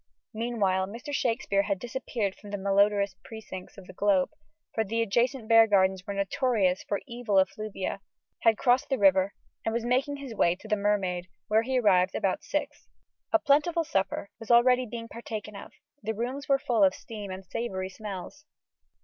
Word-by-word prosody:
Meanwhile, 210 -5 0
Mr. 240 +8 -7
Shakespeare 225 -6 +1
had 200 -1 -1
disappeared 235 -3 -3
from 205 - -13
the 205 - -3
malodorous 200 0 +2
precincts 215 -5 -9
of 195 - -11
the 185 - -12
Globe 195 -1 +2 0.4
for 220 - +1
the 225 +2 -2
adjacent 235 +3 0
bear 225 0 +7
gardens 190 -2 +2
were 200 - -3
notorious 200 -2 +1
for 200 - -2
evil 235 -4 -1
effluvia 195 +1 -1 0.4
had 225 -2 +4
crossed 250 +1 +2
the 270 - +1
river, 195 -1 +4 0.3
and 225 - -1
was 235 0 -1
making 260 +4 +1
his 275 -4 -7
way 175 -5 +3
to 205 - -13
the 215 - +2
Mermaid, 195 -3 0 0.2
where 215 +1 +4
he 260 +3 -1
arrived 190 -6 +3
about 190 -2 0
six. 295 - -3 0.4
A 330 - +6
plentiful 315 +3 +2
supper 200 -8 -2
was 225 - -10
already 250 +1 +5
being 230 +1 -6
partaken 215 -3 -7
of: 200 - -9 0.3
the 220 +1 -3
rooms 255 +6 -4
were 275 - +5
full 235 -5 +1
of 190 -1 +4
steam 210 -3 -8
and 190 0 -7
savoury 190 -2 -3
smells. 210 +8 -8
215 Hz, 175 wpm, -28 LUFS, 195-240 Hz, 0.4 s, bear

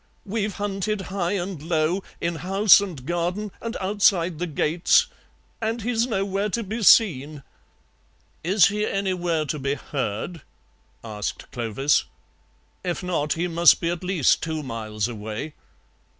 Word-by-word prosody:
"We've 210 0 -2
hunted 205 0 -2
high 180 -1 0
and 185 -4 -3
low, 165 +3 0 0.2
in 170 -1 -2
house 195 +4 +5
and 170 -11 -6
garden 175 +5 -2
and 230 0 -4
outside 185 -4 +2
the 180 - -2
gates, 160 +2 +3 0.6
and 225 0 -2
he's 235 0 +1
nowhere 195 -2 -1
to 230 +3 -2
be 220 +4 -4
seen." 155 - +4 1.0
"Is 185 +2 +5
he 210 +1 -2
anywhere 180 -6 -1
to 150 +1 -3
be 140 +1 -1
heard?" 140 - -4 0.6
asked 105 -6 -5
Clovis; 120 +5 +1 0.8
"if 180 0 -3
not, 165 -5 0
he 170 +2 -1
must 170 0 +5
be 170 -1 -1
at 175 +1 -5
least 180 -6 +2
two 160 -2 -3
miles 110 -4 -3
away." 110 +5 -6
175 Hz, 135 wpm, -24 LUFS, 150-200 Hz, 1.0 s, house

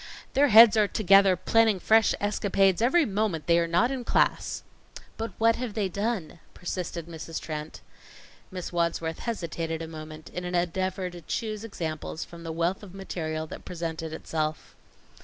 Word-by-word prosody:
"Their 285 +2 +5
heads 225 -2 +9
are 210 -2 +4
together 195 -2 +5
planning 220 +2 +3
fresh 220 +3 +4
escapades 195 -2 +2
every 300 +8 +4
moment 195 - -1
they 170 0 +4
are 170 - +1
not 175 +10 +2
in 260 -2 -3
class." - - +1 0.5
"But 225 +1 -4
what 230 0 +3
have 240 -4 -4
they 205 -4 0
done?" 200 -4 -3 0.2
persisted 175 -2 -4
Mrs. 165 -1 -6
Trent. 155 0 -6 0.7
Miss 180 -2 -6
Wadsworth 170 -1 -1
hesitated 165 -7 -3
a 165 - -5
moment 155 0 -9
in 180 - -5
an 180 0 -3
endeavor 185 +1 -1
to 175 0 -10
choose 215 +5 -4
examples 160 -7 -5
from 170 -1 -12
the 165 - -4
wealth 170 +3 -1
of 195 -3 -12
material 160 -5 -4
that - - -9
presented 165 -2 -5
itself. 155 -1 -4
180 Hz, 160 wpm, -27 LUFS, 165-215 Hz, 0.7 s, heads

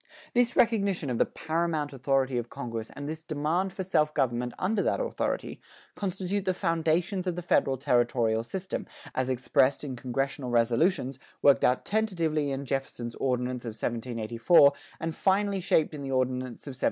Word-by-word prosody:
This 245 0 +2
recognition 200 - +2
of 120 - -1
the - - +4
paramount 160 -2 -2
authority 135 -1 +1
of 120 0 -6
congress 115 -5 -5
and 145 0 -6
this 160 +1 -5
demand 165 +4 -1
for 190 - -4
self 155 -5 +1
government 125 -3 0
under 200 +2 +1
that - - +1
authority, - - -2 0.3
constitute 195 0 -2
the 185 -1 +1
foundations 170 +2 0
of 180 - 0
the 175 - -5
federal 135 -5 +2
territorial 120 -3 +2
system, 180 +11 -5 0.3
as 130 0 -1
expressed 130 +2 +2
in 135 -3 -4
congressional 135 +2 -2
resolutions, 130 +4 +2 0.2
worked 140 -1 +6
out 125 - +2
tentatively 170 -9 0
in 135 0 -3
Jefferson's 130 -3 -3
Ordinance 125 -1 -1
of 115 -2 -5
1784, 120 +6 +3 0.3
and 165 -1 -2
finally 195 +3 +1
shaped 160 -4 +2
in 150 - -6
the 135 - -5
Ordinance 130 -1 -1
of 140 - -5
1787. 130 - -12
140 Hz, 165 wpm, -28 LUFS, 125-175 Hz, 0.3 s, worked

